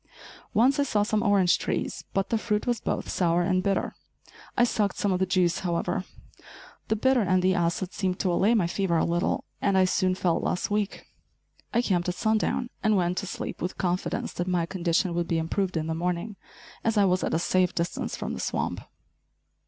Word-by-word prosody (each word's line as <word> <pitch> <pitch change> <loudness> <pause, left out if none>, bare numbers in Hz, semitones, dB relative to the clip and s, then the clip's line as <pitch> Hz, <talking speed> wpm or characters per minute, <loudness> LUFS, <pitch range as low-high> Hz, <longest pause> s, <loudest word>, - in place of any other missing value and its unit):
Once 260 +7 +4
I - - +4
saw 210 -7 +1
some 215 0 0
orange 200 -5 +3
trees, - - -3
but 195 0 0
the 225 - +1
fruit 210 -2 -1
was 240 -3 0
both - - -2
sour 175 -1 +1
and 185 +1 +1
bitter. 195 0 0 0.6
I 245 - +5
sucked 210 -4 +1
some 200 - +1
of 180 - +1
the 190 - +1
juice, 180 -2 +2
however. 175 -2 -1 0.8
The 220 - +1
bitter 260 +3 +3
and 185 -2 +2
the 185 0 +4
acid 175 +1 -1
seemed 185 -2 -1
to 180 -2 +1
allay 205 +7 +3
my 200 -6 +3
fever 170 0 0
a - - +2
little, 170 +2 0 0.2
and 195 -1 +2
I 185 - +5
soon 185 0 +1
felt 175 -3 0
less 180 - -1
weak. 205 -1 -1 0.7
I 235 +1 +2
camped 180 -5 +1
at 180 - -2
sundown, 220 +4 0
and 215 -2 +3
went 180 0 +1
to 195 - -5
sleep - - -5
with 180 - -3
confidence 180 0 -2
that 175 - -3
my 180 -2 +1
condition 170 0 0
would 170 0 -1
be 165 - 0
improved 180 +3 -1
in 155 - -1
the 160 - -2
morning, 180 +5 -2 0.5
as 225 -1 +1
I 205 - +5
was 185 0 +2
at - - 0
a - - +3
safe 180 +1 +1
distance 170 0 -2
from - - -4
the - - -5
swamp. - - -2
185 Hz, 205 wpm, -27 LUFS, 175-210 Hz, 0.8 s, I